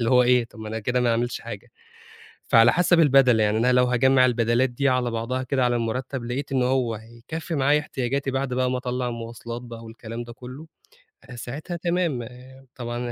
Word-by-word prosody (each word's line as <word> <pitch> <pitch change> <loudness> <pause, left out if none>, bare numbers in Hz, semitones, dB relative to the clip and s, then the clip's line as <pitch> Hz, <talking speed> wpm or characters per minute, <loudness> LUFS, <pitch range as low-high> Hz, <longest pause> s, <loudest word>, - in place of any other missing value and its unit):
اللي 115 - +1
هو 125 -1 +6
إيه 125 -1 +3
طَب 115 - -17
ما 110 0 -7
أنا 110 +1 -3
كده 125 +3 -1
ما 120 -1 +2
عملتش 120 +1 -1
حاجة، - - -9 0.7
فعلى 115 +1 +5
حسب 175 -1 +3
البَدَل 135 -6 +5
يعني 105 0 +2
أنا 120 +3 +3
لو 125 0 +4
هاجمع 130 +1 +4
البَدَلات 120 +1 +2
دي 140 +3 0
على 125 -2 0
بعضها 115 +3 -2
كده 130 0 0
على 120 0 +1
المرتب 120 +3 -3
لقيت 130 +4 -4
إن 130 -2 +2
هو 125 -3 +1
هيكفي 120 +10 -7
معايا 145 +1 +3
احتياجاتي 135 -1 -2
بعد 135 -1 -2
بقى 125 0 +1
ما 130 - 0
أطلّع 125 0 -3
المواصلات 115 0 -6
بقى 115 -2 -10
والكلام 115 +1 -7
ده 120 0 -10
كله، 130 +6 -10 0.7
ساعتها 145 +9 -6
تمام 170 -6 -1
آآ 130 +3 -12
طبعًا 120 -1 -5
125 Hz, 195 wpm, -24 LUFS, 120-130 Hz, 0.7 s, هو